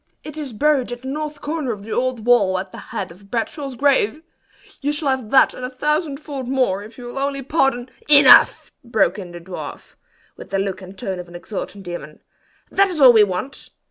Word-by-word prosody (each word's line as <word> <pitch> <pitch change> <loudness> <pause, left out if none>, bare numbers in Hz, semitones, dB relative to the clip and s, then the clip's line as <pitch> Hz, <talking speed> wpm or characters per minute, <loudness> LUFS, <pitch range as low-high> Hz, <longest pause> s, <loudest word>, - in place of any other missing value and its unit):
"It 305 - -9
is 295 -4 -5
buried 270 +1 +1
at 245 +1 -7
the - - -7
north 300 +1 -5
corner 300 -4 -3
of 205 -3 -7
the 220 - -9
old 250 -2 -1
wall 205 -7 +4
at 185 0 -5
the - - -9
head 190 -3 -4
of 195 +4 -17
Bradshaw's 255 +4 -3
grave. 280 +1 +1 0.6
You 290 +1 0
shall 295 -1 -1
have 260 -5 -1
that 265 - +5
and 255 - -9
a 250 - -3
thousandfold 290 -1 -2
more 250 -7 0
if 215 +2 -12
you'll 245 +1 -7
only 275 0 -2
pardon 270 -3 0
" - - -24
"Enough!" 290 -1 +7
broke 210 -5 +1
in 180 -3 -8
the 175 - -9
dwarf, 180 +2 -9 0.4
with - - -12
the 195 - -1
look 195 -1 -2
and 185 +1 -12
tone 190 -1 -4
of 180 - -8
an 175 - -13
exultant 200 +2 -7
demon. 175 -4 -8 0.5
"That 395 0 +4
is 355 -5 -4
all 260 -3 +8
we 220 -2 +7
want! 200 +8 -4
245 Hz, 210 wpm, -20 LUFS, 195-280 Hz, 0.6 s, all